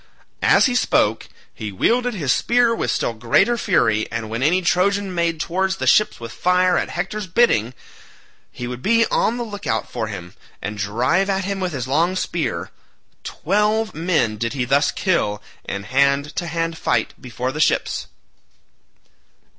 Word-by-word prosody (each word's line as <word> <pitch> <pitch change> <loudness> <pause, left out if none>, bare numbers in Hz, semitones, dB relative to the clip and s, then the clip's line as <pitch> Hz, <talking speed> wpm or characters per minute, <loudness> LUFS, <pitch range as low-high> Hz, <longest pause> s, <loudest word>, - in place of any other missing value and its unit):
As - - +5
he 255 - +1
spoke 110 - +1 0.2
he 105 -1 -6
wielded 245 - +1
his 145 -9 +1
spear 240 -1 +2
with - - -2
still 120 - 0
greater 120 - +2
fury, 110 - +1
and 115 -1 -4
when 115 +2 -3
any 175 +7 +2
Trojan 195 +2 +1
made 170 -2 0
towards 190 +4 -1
the - - -4
ships 215 - +3
with 115 -1 -7
fire 180 +4 +2
at - - 0
Hector's 195 +3 -4
bidding, 130 - +2 0.8
he 125 - -7
would 125 0 -6
be 230 - +3
on 235 - +1
the 240 - -2
look 205 -3 -7
out 110 - -1
for 115 -3 -3
him, 90 -4 -8 0.3
and 105 +1 -5
drive 125 - +1
at 190 -1 0
him 200 0 -3
with 185 -1 -2
his 130 -3 -4
long 165 +7 +1
spear. 175 -3 -3 0.5
Twelve 210 +5 0
men 160 -10 0
did 115 +3 -2
he 130 -3 -1
thus 140 +4 +3
kill 135 - 0 0.3
in 100 0 -4
hand 140 +5 +1
to 175 - -2
hand 165 0 -2
fight - - 0
before 125 0 -4
the 150 - -6
ships. - - +1
165 Hz, 170 wpm, -21 LUFS, 120-195 Hz, 0.8 s, As